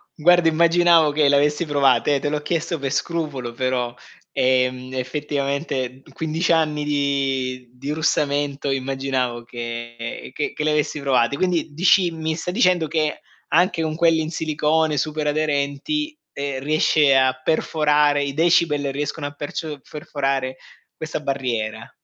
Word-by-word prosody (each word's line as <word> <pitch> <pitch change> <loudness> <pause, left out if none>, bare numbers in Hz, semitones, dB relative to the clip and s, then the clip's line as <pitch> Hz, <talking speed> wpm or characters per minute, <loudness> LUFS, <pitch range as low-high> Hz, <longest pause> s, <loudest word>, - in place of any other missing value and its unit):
Guarda, 175 +1 +4
immaginavo 170 -1 +4
che 145 -1 +3
le 140 - +4
avessi 150 +3 +2
provate, 145 -1 +3
eh, 140 - +1
te 145 - -2
l'ho 150 0 -2
chiesto 165 +1 -2
per 135 -1 -3
scrupolo 145 -6 -2
però, 125 -1 -1 0.4
ehm, 130 0 +1
effettivamente 135 -1 -3
15 160 +3 -1
anni 155 -2 +2
di 135 -3 -1
di 135 +3 -7
russamento 145 -2 0
immaginavo 130 -2 -2
che 120 0 -6
che 145 - -3
che 150 - -3
le 155 - +2
avessi 150 0 0
provate. 130 -2 +2
Quindi, 175 -4 0
dici 180 +2 +4
mi 160 -1 -3
sta 175 +2 -4
dicendo 180 -5 +2
che 155 0 -1 0.3
anche 175 +1 +3
con 155 -1 -2
quelli 165 -1 +3
in 155 - -3
silicone 155 -1 0
super 155 +2 -1
aderenti, 150 - -1 0.2
ehm, 140 -1 -3
riesce 150 -1 +3
a 130 -1 +4
perforare, 150 -2 +2
i 140 -1 -3
decibel 155 -3 +2
riescono 145 +2 -3
a 145 - -4
percio 145 +1 -5
perforare 135 -3 -2 0.4
questa 160 -1 -4
barriera. 115 -6 -3
145 Hz, 140 wpm, -22 LUFS, 135-160 Hz, 0.4 s, Guarda